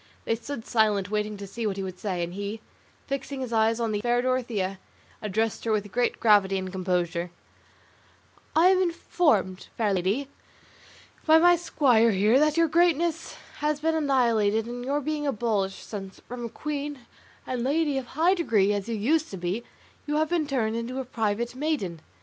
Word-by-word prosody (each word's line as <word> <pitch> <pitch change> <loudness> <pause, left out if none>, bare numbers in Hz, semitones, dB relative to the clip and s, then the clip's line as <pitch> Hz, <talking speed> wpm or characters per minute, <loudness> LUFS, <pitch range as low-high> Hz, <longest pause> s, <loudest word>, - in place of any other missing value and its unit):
They - - +1
stood 235 +1 -7
silent 210 -4 +1
waiting 210 0 -1
to 200 - -7
see 220 +3 -4
what 200 -2 -2
he 195 - -3
would 185 -1 -6
say, 185 -4 -2
and 170 +1 -5
he, 205 +3 -4 0.5
fixing 275 0 -4
his 250 -2 -4
eyes 225 +1 +2
on 230 -2 0
the 205 -1 -1
fair 240 +1 +2
Dorothea, 230 -7 -1 0.4
addressed 215 +1 -1
her 225 - -1
with 205 -2 -1
great 245 +2 0
gravity 200 -3 +4
and 185 -1 -4
composure: 180 -2 -1 1.3
"I 335 +4 +6
am 375 0 +4
informed, 300 - +1
fair 215 -3 +1
lady, 195 +9 0 1.0
by 315 0 +8
my 350 +2 +6
squire 255 -9 +3
here 215 +5 +4
that 305 +1 +2
your 335 0 +4
greatness 335 0 +1 0.2
has 300 0 0
been 320 +1 +1
annihilated 235 -8 +2
and 245 +1 -6
your 285 +3 -1
being 300 0 -2
abolished, 210 -6 -1
since, 195 -3 -7
from 240 0 -6
a - - -5
queen 290 +1 -5 0.4
and 250 -2 -3
lady 290 +1 +1
of 255 - -9
high 330 +8 +2
degree 215 - +2
as 205 +2 -3
you 230 - -1
used 300 +9 +1
to 195 - -6
be, 180 +6 -3 0.4
you 295 - -1
have 310 0 +1
been 335 -3 0
turned 230 -6 0
into 235 +3 -3
a 265 - -4
private 230 0 -2
maiden. 260 - -2
235 Hz, 180 wpm, -26 LUFS, 205-290 Hz, 1.3 s, by